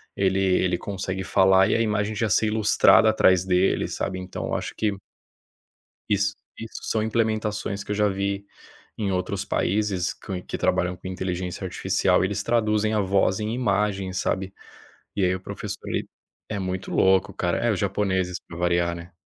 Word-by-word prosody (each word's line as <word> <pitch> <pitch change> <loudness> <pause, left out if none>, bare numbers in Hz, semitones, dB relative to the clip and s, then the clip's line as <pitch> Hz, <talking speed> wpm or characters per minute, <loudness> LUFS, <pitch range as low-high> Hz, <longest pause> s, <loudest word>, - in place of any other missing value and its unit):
ele 95 0 +1
ele 90 -2 +2
consegue 95 -1 -4
falar 95 0 +4
e - - +2
a 115 - +2
imagem 105 -1 0
já 110 +1 0
ser 110 +3 +3
ilustrada 110 +1 +5
atrás 95 -4 +4
dele, 95 0 +2
sabe. 95 - -3
Então 90 0 -6
eu - - -2
acho - - -4
que 105 -2 0 1.1
isso, 100 0 +1 0.2
isso 115 0 -7
são 110 -1 0
implementações 110 -2 -1
que - - -11
eu 105 - +1
já 105 0 +2
vi 100 0 -2 0.5
em 100 -3 -1
outros 90 0 -2
países 95 -2 0
com, 95 -2 -6
que - - -5
trabalham 90 +1 +1
com 95 +1 -8
inteligência 90 -1 -4
artificial, - - +1
eles 100 +1 -1
traduzem 110 -2 +1
a 105 - +2
voz 95 0 +2
em 110 +2 -2
imagem, 100 -5 0
sabe? 95 +1 -2 0.6
E 100 - +1
aí 90 0 +2
o - - -5
professor - - -6
ele - - -2 0.4
é 110 - -3
muito 95 0 -4
louco, 95 0 +3
cara 90 -1 -1
é 120 0 +1
os 100 - -1
japoneses 95 -3 0
pra 85 - -9
variar, 85 0 +1
né. 85 +1 -10
95 Hz, 175 wpm, -24 LUFS, 95-105 Hz, 1.1 s, ilustrada